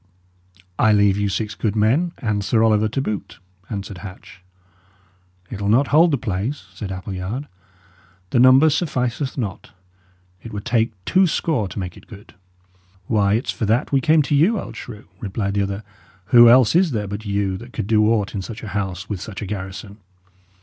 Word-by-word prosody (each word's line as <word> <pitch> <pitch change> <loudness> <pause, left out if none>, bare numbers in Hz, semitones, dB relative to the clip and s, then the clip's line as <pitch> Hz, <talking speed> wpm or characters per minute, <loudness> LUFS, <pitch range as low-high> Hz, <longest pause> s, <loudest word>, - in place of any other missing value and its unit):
"I 110 -2 +5
leave 100 -2 +4
you 105 -1 0
six 105 +1 -2
good 110 -1 -2
men, 130 +12 +2
and 105 -3 -2
Sir 110 +2 +2
Oliver 110 -1 +3
to 130 +5 -2
boot," 105 -6 -5 0.3
answered 100 -3 -6
Hatch. 95 -1 -11 1.1
"It'll 100 -1 -3
not 130 +6 +3
hold 165 +4 +5
the 145 - +1
place," 115 +5 -3
said 100 -3 -6
Appleyard; 95 +8 -5 0.8
"the - - +2
number 130 +5 +6
sufficeth 135 -4 -2
not. 105 -8 -5 0.7
It 115 - -9
would 100 -1 -6
take 115 -2 +1
two 190 0 +4
score 155 - 0
to 95 - -10
make 90 -3 -4
it - - -16
good." 105 0 -13 0.7
"Why, 100 -2 +2
it's 115 - -1
for 110 - -3
that 115 +3 +1
we 135 -1 +3
came 155 +2 +4
to 140 - -2
you, 180 +10 +3
old - - -8
shrew!" 110 -3 -9
replied 100 -1 -3
the 100 - +1
other. 100 +1 -3 0.5
"Who 120 -1 +9
else 125 +2 +5
is 180 0 +4
there 110 -6 -2
but 100 +2 -6
you 100 -2 -1
that 120 +5 -11
could - - -4
do 105 0 +3
aught 105 -3 0
in 100 - -3
such 110 +4 -8
a 110 - -6
house 95 -1 -4
with 100 -4 -5
such 105 -1 -7
a - - -4
garrison?" 100 +1 -7
110 Hz, 185 wpm, -21 LUFS, 100-125 Hz, 1.1 s, Who